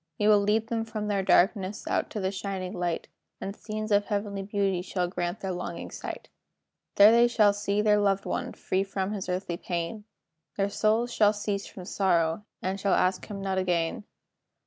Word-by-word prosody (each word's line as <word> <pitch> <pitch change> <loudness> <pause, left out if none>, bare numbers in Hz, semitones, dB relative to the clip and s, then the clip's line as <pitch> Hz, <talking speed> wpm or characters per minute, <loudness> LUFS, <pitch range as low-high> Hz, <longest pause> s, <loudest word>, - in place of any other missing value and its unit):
"We 210 - +2
will 210 -1 +7
lead 210 +2 +2
them 225 0 -2
from 215 -2 -4
their 200 -1 +1
darkness 195 +1 +2
Out - - 0
to 215 - -4
the 190 -1 -1
shining 190 -2 -4
light, 175 -2 -2 0.3
And 195 +1 -5
scenes 215 0 -5
of 205 0 +4
heavenly 200 -2 -2
beauty 195 -2 0
Shall 180 -1 -2
greet 175 +2 -3
their 190 - -2
longing 175 -1 -5
sight. - - -7 0.7
There 230 +4 +7
shall 215 -4 +4
they 200 - -6
see 205 0 +1
their 210 -1 +4
loved 195 -1 +1
one, - - -3
Free 190 +1 -1
from 195 0 -3
his 195 -3 -4
earthly 180 -1 -2
pain; 175 +5 -4 0.5
Their 200 0 +1
souls 220 +3 +1
shall 210 -1 +4
cease 205 -1 -3
from 185 - -10
sorrow, 175 -1 +1 0.2
And 190 +1 -2
shall 195 -1 +2
ask 185 +1 +1
him 200 -2 -6
not 190 -1 0
again. 175 +1 -1
200 Hz, 190 wpm, -28 LUFS, 185-210 Hz, 0.7 s, will